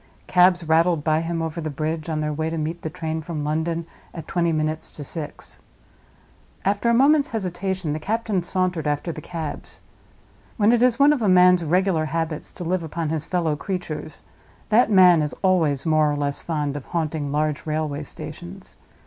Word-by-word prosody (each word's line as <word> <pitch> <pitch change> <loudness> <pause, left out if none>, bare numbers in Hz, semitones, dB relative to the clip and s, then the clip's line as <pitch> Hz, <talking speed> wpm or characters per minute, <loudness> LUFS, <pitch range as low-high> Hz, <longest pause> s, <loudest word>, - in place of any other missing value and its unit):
Cabs 180 -1 +4
rattled 165 0 +3
by 155 0 +2
him 165 0 -2
over 160 +1 -4
the 155 - -3
bridge 155 +2 -3
on 155 -1 -1
their 150 0 -1
way 160 +2 -2
to 165 - -3
meet 160 +2 -3
the 160 - -4
train 160 -1 -4
from 160 -2 -4
London, 160 +2 -1 0.3
at 165 - -7
twenty 170 -1 +1
minutes 155 0 -2
to 145 - -6
six. 150 +1 -6 1.1
After 205 +4 +1
a - - +4
moment's 285 +3 +4
hesitation, 185 -5 -2
the 155 - -3
captain 215 +1 -1
sauntered 180 -3 -1
after 150 +3 -1
the 155 - -8
cabs. 160 -3 -6 0.8
When 215 0 +4
it 240 -1 +3
is 250 -2 +4
one 285 +2 +6
of 280 - -2
a 210 - +2
man's 180 -1 +6
regular 175 0 +1
habits 165 0 -3
to - - -7
live 180 +1 0
upon 160 0 -3
his 155 -1 -2
fellow 170 -4 0
creatures, 160 -3 -5 0.5
that 225 +3 +4
man 180 -5 +6
is 150 -1 -2
always 160 -8 +2
more 155 -2 +3
or - - -1
less 145 -1 -2
fond 150 -4 -2
of 145 - -6
haunting 155 -4 -2
large 150 +1 -1
railway 155 -1 -2
stations. 175 +6 -9
165 Hz, 185 wpm, -23 LUFS, 155-180 Hz, 1.1 s, one